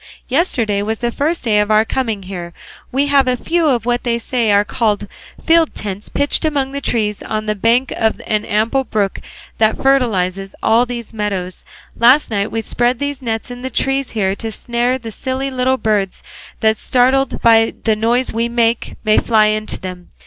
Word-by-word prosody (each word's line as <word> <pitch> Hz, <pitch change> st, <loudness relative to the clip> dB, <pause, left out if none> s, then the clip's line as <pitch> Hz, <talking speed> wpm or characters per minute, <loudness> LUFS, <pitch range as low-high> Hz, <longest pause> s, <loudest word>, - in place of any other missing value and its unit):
Yesterday 240 Hz, -, +1 dB
was 220 Hz, +2 st, -2 dB
the 240 Hz, +1 st, -2 dB
first 310 Hz, +7 st, -1 dB
day 215 Hz, -4 st, +2 dB
of 210 Hz, 0 st, +1 dB
our 215 Hz, +1 st, +4 dB
coming 225 Hz, -6 st, -2 dB
here; 175 Hz, -2 st, -7 dB, 0.4 s
we 275 Hz, +3 st, +1 dB
have 280 Hz, -2 st, +3 dB
a 250 Hz, 0 st, +1 dB
few 335 Hz, +4 st, 0 dB
of 240 Hz, -6 st, +1 dB
what 245 Hz, 0 st, 0 dB
they 235 Hz, -1 st, 0 dB
say 235 Hz, -2 st, 0 dB
are 205 Hz, 0 st, +4 dB
called 210 Hz, -2 st, -1 dB, 0.4 s
field 330 Hz, -1 st, +3 dB
tents 200 Hz, -1 st, -5 dB
pitched 285 Hz, 0 st, +1 dB
among 285 Hz, -4 st, 0 dB
the 280 Hz, 0 st, -4 dB
trees 210 Hz, -5 st, -1 dB
on 215 Hz, 0 st, -3 dB
the 215 Hz, -, 0 dB
bank 230 Hz, +5 st, +1 dB
of 220 Hz, -1 st, 0 dB
an 215 Hz, -1 st, 0 dB
ample 225 Hz, +6 st, 0 dB
brook 205 Hz, -6 st, -2 dB, 0.4 s
that 220 Hz, 0 st, +3 dB
fertilises 195 Hz, -8 st, 0 dB
all 235 Hz, +3 st, +3 dB
these 235 Hz, -2 st, -6 dB
meadows; 195 Hz, -4 st, -4 dB, 0.3 s
last 250 Hz, +4 st, +4 dB
night 200 Hz, -1 st, -1 dB
we 225 Hz, -, -2 dB
spread 240 Hz, +3 st, 0 dB
these 285 Hz, 0 st, -4 dB
nets 225 Hz, -1 st, -3 dB
in 245 Hz, 0 st, -8 dB
the 260 Hz, -, -4 dB
trees 270 Hz, +2 st, 0 dB
here 195 Hz, -2 st, +1 dB
to 225 Hz, +2 st, -5 dB
snare 240 Hz, +3 st, -1 dB
the 230 Hz, -3 st, -8 dB
silly 260 Hz, +5 st, -3 dB
little 260 Hz, 0 st, +1 dB
birds 210 Hz, -5 st, -1 dB, 0.4 s
that 220 Hz, 0 st, +3 dB
startled 260 Hz, +3 st, +1 dB
by 225 Hz, -1 st, +5 dB
the 220 Hz, -2 st, +2 dB
noise 235 Hz, +4 st, 0 dB
we 230 Hz, +1 st, 0 dB
make 235 Hz, -1 st, 0 dB
may 215 Hz, -1 st, +4 dB
fly 220 Hz, -2 st, +3 dB
into 215 Hz, 0 st, -1 dB
them. 180 Hz, -1 st, -8 dB
230 Hz, 190 wpm, -17 LUFS, 215-260 Hz, 0.4 s, by